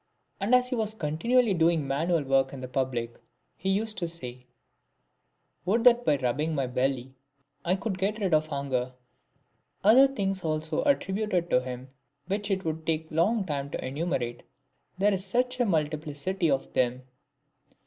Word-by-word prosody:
And 210 +5 +3
as 250 0 +3
he 255 - -1
was 220 -2 -2
continually 215 +8 +2
doing 165 -4 +2
manual 160 +4 +1
work 135 0 +2
in 130 -2 -6
public, 125 -3 -2 0.4
he 190 +1 0
said 215 -4 -6
one 170 0 -3
day, 125 -2 -9 0.5
" - - -47
Would 225 +5 +2
that 245 0 +6
by 145 - +3
rubbing 145 +5 -1
my 135 -2 0
belly 130 +1 -1 0.5
I 180 +1 +2
could 190 -1 -3
get 200 +3 0
rid 195 -5 0
of 155 0 +3
hunger." 135 -4 -2 0.9
Other 245 +7 +8
sayings 195 -8 -2
also 155 0 -1
are 285 - +6
attributed 190 -6 -2
to 125 - +4
him, 125 +1 -7 0.4
which 205 +2 -2
it 190 -2 -1
would 160 0 -2
take 160 0 -1
a - - -11
long 195 +6 +2
time 140 -4 -3
to - - -5
enumerate, 130 -4 -2 0.6
there 200 +2 +3
is 190 -1 -2
such 250 +5 0
a 245 - +3
multiplicity 155 +2 -1
of 135 -1 -1
them. 125 0 +1
165 Hz, 170 wpm, -28 LUFS, 135-200 Hz, 0.9 s, Other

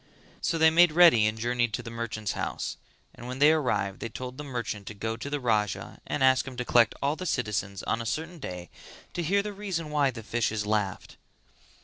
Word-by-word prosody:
So 165 - 0
they 160 0 +6
made 170 0 +6
ready 160 -11 +7
and 110 +1 -2
journeyed 120 0 0
to - - -3
the 115 - -7
merchant's 110 -3 -3
house; - - -3 0.4
and 120 - -10
when 125 +1 -5
they 145 +3 +6
arrived 125 -10 0
they 115 - -4
told 125 +2 -7
the - - -4
merchant 120 -7 -4
to 105 - -7
go 110 +2 -3
to 120 +5 -6
the 145 0 -2
Raja 105 -6 -1
and 145 - -1
ask 130 0 +4
him 130 -2 -8
to 125 - -2
collect 120 -3 +4
all 140 +2 +1
the 185 +2 -5
citizens 105 - -2
on 115 - -1
a - - -5
certain 165 +6 -3
day 90 -8 -7 0.4
to 175 - -2
hear 200 +5 +2
the 210 0 -5
reason 185 -6 -4
why 145 -2 +3
the 115 -3 -7
fishes 110 -2 -1
laughed. 105 -3 -2
125 Hz, 220 wpm, -28 LUFS, 110-150 Hz, 0.4 s, ready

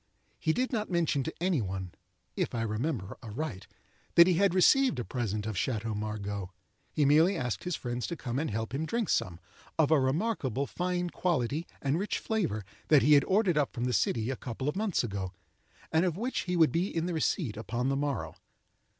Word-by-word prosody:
He 160 - +1
did 250 +9 0
not 215 -2 -1
mention 170 -5 +1
to 160 - -3
any 175 -5 +1
one—if 95 +3 -5
I 115 - 0
remember 110 - -3
aright—that 125 - 0
he 185 - +3
had 190 +1 +3
received 260 - +5
a 120 - -3
present 105 -4 -2
of 110 -1 -3
Chateau 110 +2 -1
Margaux. 105 -2 -4 0.4
He 150 - +2
merely 160 +7 +5
asked 125 0 -3
his 180 -2 -1
friends 120 -1 -3
to 170 - -3
come 125 -4 -3
and 160 - -1
help 110 +2 -3
him 155 +4 -2
drink 230 0 -1
some, 85 -2 0 0.4
of 160 -2 +3
a 155 - +6
remarkable 140 - 0
fine 180 +2 -2
quality 155 -2 -1 0.2
and 140 +4 +1
rich 205 - -1
flavour, 145 - -1 0.2
that 150 -3 +6
he 150 - +6
had 140 -2 +7
ordered 190 -5 +3
up 145 - 0
from 120 - -3
the 125 0 0
city 110 +4 +1
a - - -2
couple 125 +2 -5
of 150 - 0
months 205 -6 0
ago, 100 -4 -4 0.6
and 160 +2 +3
of 175 -2 0
which 245 +5 -2
he 180 - +1
would 160 -3 +5
be 170 +3 +1
in 165 -4 -2
the 180 - -2
receipt 155 - 0
upon 120 +4 -2
the 135 - +1
morrow. 140 0 -2
140 Hz, 200 wpm, -30 LUFS, 115-175 Hz, 0.6 s, had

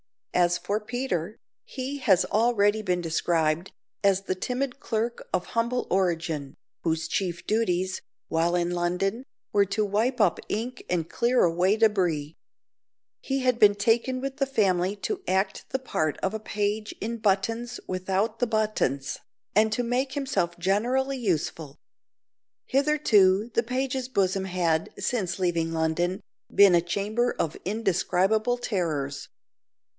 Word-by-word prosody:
As 175 -1 +3
for 205 +1 -2
Peter, 220 -5 -3 0.3
he 270 +1 -5
has 195 -8 +4
already 215 -2 +2
been 180 -4 0
described 165 0 0 0.3
as 195 -1 +4
the 190 - -1
timid 250 +7 -3
clerk 230 0 -3
of 180 - -1
humble 235 +2 0
origin, 165 -6 0 0.3
whose 160 -1 0
chief 175 -1 -2
duties, 185 -4 0 0.3
while 165 +2 +1
in 175 0 0
London, 180 +7 -1 0.3
were 200 -1 +4
to 205 +2 0
wipe 225 +6 0
up 205 -5 +3
ink 245 +4 -3
and 170 -3 0
clear 245 +1 +2
away 180 +4 +3
debris. 180 -9 +1 0.9
He 270 0 -2
had 250 -2 +1
been 205 -1 +6
taken 235 +5 +1
with 275 0 -4
the 275 - +1
family 195 -6 +1
to 410 -3 -2
act 190 +1 0
the - - 0
part 155 - -2
of 190 - -1
a 220 - -3
page 210 0 -2
in 230 +3 -3
buttons 225 +3 0
without 190 +4 -1
the 245 - +2
buttons 215 -11 -1 0.3
and 215 +2 +4
to 245 - 0
make 255 +3 -1
himself 260 - -1
generally 245 +9 +1
useful. 160 - -2 0.9
Hitherto 235 -8 +3
the 230 - +2
page's 260 +1 -2
bosom 195 -4 +1
had, 170 -3 0
since 190 -7 -1
leaving 170 -3 0
London, 165 +3 0 0.3
been 200 -2 +7
a 170 - +5
chamber 210 +7 -1
of 160 - -1
indescribable 210 +3 +1
terrors. 160 - -2
200 Hz, 140 wpm, -26 LUFS, 175-235 Hz, 0.9 s, been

